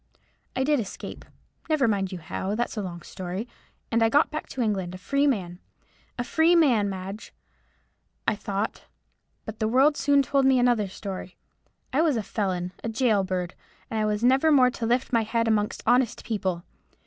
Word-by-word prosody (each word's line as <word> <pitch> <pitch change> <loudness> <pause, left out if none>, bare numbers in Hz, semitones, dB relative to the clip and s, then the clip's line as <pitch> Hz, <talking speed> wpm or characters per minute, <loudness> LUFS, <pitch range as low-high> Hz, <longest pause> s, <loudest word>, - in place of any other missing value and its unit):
I 260 - +1
did 295 0 +2
escape,—never 270 - -4
you - - +3
mind 195 -2 -1
how, 190 +3 -4
that's 240 +2 -2
a 215 - -2
long 175 -3 -6
story,—and 200 +4 -5
I 225 - +4
got 290 +6 +3
back 310 - -5
to 260 - -4
England, 190 -5 -1
a - - -7
free 280 +9 +1
man; 180 -9 -1 0.6
a 245 - -1
free 320 +7 +3
man, 245 -11 +4
Madge, 195 +2 -7 1.0
I 220 - +3
thought; 200 +1 -3 0.6
but 220 -1 -7
the 215 - +1
world 270 +6 +4
soon 285 -1 +3
told 275 +1 +1
me 265 -1 +5
another 240 -4 +3
story. 190 -1 -7 0.6
I 285 - +3
was 310 -6 +2
a 220 - -2
felon, 185 -4 -2
a 230 - -2
gaol 220 -3 +2
bird; 185 -2 -3 0.4
and 220 - -1
I 215 - +1
was 210 +1 -1
never 265 +5 +4
more 255 -4 +5
to 230 -2 -3
lift 245 +2 0
my 230 - +4
head 230 +1 0
amongst 210 -2 0
honest 245 -2 +2
people. 190 -6 -2
225 Hz, 180 wpm, -26 LUFS, 195-260 Hz, 1.0 s, me